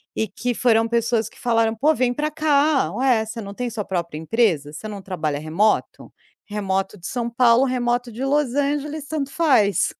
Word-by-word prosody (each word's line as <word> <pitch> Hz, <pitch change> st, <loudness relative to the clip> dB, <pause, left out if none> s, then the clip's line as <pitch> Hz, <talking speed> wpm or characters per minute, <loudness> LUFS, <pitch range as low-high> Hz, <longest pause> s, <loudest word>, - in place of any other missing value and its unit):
e 220 Hz, -, -1 dB
que 245 Hz, +5 st, -3 dB
foram 225 Hz, -1 st, +3 dB
pessoas 235 Hz, -1 st, 0 dB
que -, -, -20 dB
falaram: 230 Hz, -2 st, +1 dB
"Pô, 290 Hz, +8 st, +3 dB
vem 250 Hz, -2 st, +1 dB
para 300 Hz, +4 st, -1 dB
cá. 295 Hz, -, +2 dB
Ué, 245 Hz, -1 st, +2 dB
você 225 Hz, +1 st, -6 dB
não 200 Hz, -1 st, -8 dB
tem 245 Hz, +3 st, -3 dB
sua 225 Hz, -2 st, -4 dB
própria 170 Hz, -4 st, -3 dB
empresa? 160 Hz, -5 st, +1 dB
Você 155 Hz, +8 st, -8 dB
não 205 Hz, -2 st, -7 dB
trabalha 155 Hz, -6 st, -3 dB
remoto? 165 Hz, +8 st, 0 dB, 0.3 s
Remoto 195 Hz, -1 st, -2 dB
de 175 Hz, -, -7 dB
São 235 Hz, -2 st, -2 dB
Paulo, 235 Hz, +1 st, +4 dB
remoto 245 Hz, -1 st, -1 dB
de 235 Hz, +4 st, -6 dB
Los 275 Hz, -2 st, +1 dB
Angeles 290 Hz, +1 st, -1 dB
tanto 285 Hz, -3 st, -3 dB
faz". 250 Hz, -, +2 dB
235 Hz, 185 wpm, -22 LUFS, 205-265 Hz, 0.3 s, Paulo